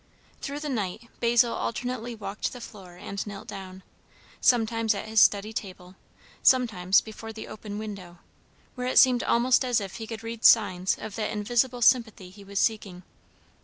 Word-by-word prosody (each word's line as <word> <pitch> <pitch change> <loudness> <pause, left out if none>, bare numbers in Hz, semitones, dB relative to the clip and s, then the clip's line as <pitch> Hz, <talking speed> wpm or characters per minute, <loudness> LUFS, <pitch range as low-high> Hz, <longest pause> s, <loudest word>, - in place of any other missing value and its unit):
Through 285 +1 -5
the 300 - -4
night 220 -1 -4
Basil 235 0 +3
alternately 245 0 -4
walked 205 -1 -4
the 250 - -9
floor 190 -6 -12
and 195 +2 -5
knelt 200 -1 -8
down, 190 -1 -9 0.6
sometimes 225 -2 +2
at 200 - -6
his 220 0 +3
study 205 +2 +3
table, 185 -4 -7 0.5
sometimes 220 -8 +4
before 225 0 -9
the 220 0 -9
open 205 -1 -8
window, 200 -5 -8 0.6
where 250 -1 -4
it 255 - -1
seemed 250 -2 +6
almost 245 +2 +3
as 245 -3 +1
if 195 +1 -7
he 225 -1 -7
could 225 0 -7
read 230 0 -7
signs 185 -4 +4
of 220 - -8
that 215 - -2
invisible 240 +4 0
sympathy 220 -7 +2
he 200 +1 -14
was 200 0 -8
seeking. 195 -5 -1
220 Hz, 165 wpm, -26 LUFS, 195-235 Hz, 0.6 s, seemed